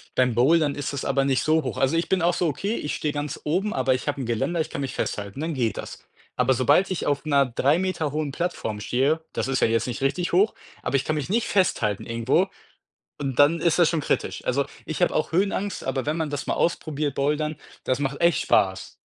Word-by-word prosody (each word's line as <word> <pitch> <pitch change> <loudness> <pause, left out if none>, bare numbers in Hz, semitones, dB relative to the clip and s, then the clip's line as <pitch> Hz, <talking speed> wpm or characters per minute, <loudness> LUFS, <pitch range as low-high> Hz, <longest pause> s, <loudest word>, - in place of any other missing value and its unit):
Beim 125 -2 +3
Bouldern 145 +4 +3
ist 145 0 -4
es 140 - -3
aber 135 -1 +1
nicht 135 -2 +1
so 155 -1 +2
hoch. 130 - -4
Also, 135 +5 +2
ich 165 - -1
bin 190 -2 +2
auch 175 +1 +3
so: 175 -1 0
„Okay, 200 +9 -2
ich 150 - -3
stehe 150 -1 -2
ganz 145 0 -4
oben, 185 +8 0
aber 130 0 +2
ich 125 - -4
habe 140 -2 -1
'n - - -3
Geländer, 135 +9 0
ich - - -3
kann 140 - -4
mich 135 - -3
festhalten“, 100 +5 -4
dann 160 0 -2
geht 120 -5 -1
das. - - -8 0.3
Aber 125 0 +2
obald 180 +9 +4
ich 180 - -2
auf 145 +1 0
'ner 140 -2 +4
3 140 +7 +2
Meter 185 -6 -1
hohen 150 -2 -2
Plattform 140 -10 -3
stehe, 135 +9 +1
das - - -2
ist 135 - +1
ja - - +5
jetzt 115 +1 0
nicht 130 +3 -4
richtig 175 +6 0
hoch, 200 +5 +3 0.3
aber - - -2
ich 135 - +2
kann 155 - -1
mich 150 0 -3
nicht 230 +3 +1
festhalten 110 - +1
irgendwo 115 - +1 0.7
und 135 -2 -3
dann 155 +3 +5
ist 170 +1 +2
das 170 - +6
schon 160 -3 0
kritisch. - - -2
Also, 140 +2 +1 0.2
ich 160 +3 -4
habe 175 - +2
auch 155 - 0
Höhenangst, 195 +2 0
aber 135 0 -2
wenn 150 +2 -1
man 160 -3 -1
das 145 -1 -4
mal - - 0
ausprobiert, 150 -4 -1
Bouldern, 150 +2 0 0.3
das 130 +1 0
macht 135 0 -2
echt 170 -3 +3
Spaß. 95 -1 +1
145 Hz, 240 wpm, -24 LUFS, 130-165 Hz, 0.7 s, das